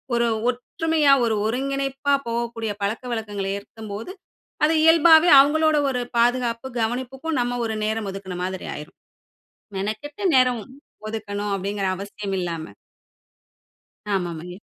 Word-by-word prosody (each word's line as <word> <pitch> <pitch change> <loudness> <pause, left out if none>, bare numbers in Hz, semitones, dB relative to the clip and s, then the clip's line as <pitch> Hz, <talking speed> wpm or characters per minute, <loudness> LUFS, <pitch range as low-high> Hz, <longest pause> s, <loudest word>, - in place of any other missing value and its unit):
ஒரு 235 0 +2 0.2
ஒற்றுமையா, 295 +4 +1
ஒரு 225 -1 +1
ஒருங்கிணைப்பா 275 +3 -1
போகக்கூடிய 230 -1 -2
பழக்கவழக்கங்கள 215 -2 -3
ஏற்கும்போது, 215 - -8 0.5
அது 315 - +2
இயல்பாவே 325 +1 +7
அவுங்களோட 310 +2 +4
ஒரு 250 -1 -1 0.2
பாதுகாப்பு 240 0 +1
கவனிப்புக்கும் 260 +6 -2
நம்ம 245 0 -1
ஒரு 220 - -3
நேரம் 215 -1 -2
ஒதுக்குனமாதிரி 185 -1 -5
ஆயிரும். 150 - -10 0.8
மெனக்கெட்டு 215 - -4
நேரம் 250 -3 +3 0.5
ஒதுக்கணும் 205 -2 -4
அப்பிடிங்கிற 195 0 -2
அவசியம் 200 0 -5
இல்லாம. 165 -2 -4 1.4
ஆமா, 180 -3 -1
ஆமாங்க. 175 +3 -8
230 Hz, 105 wpm, -23 LUFS, 200-270 Hz, 1.4 s, இயல்பாவே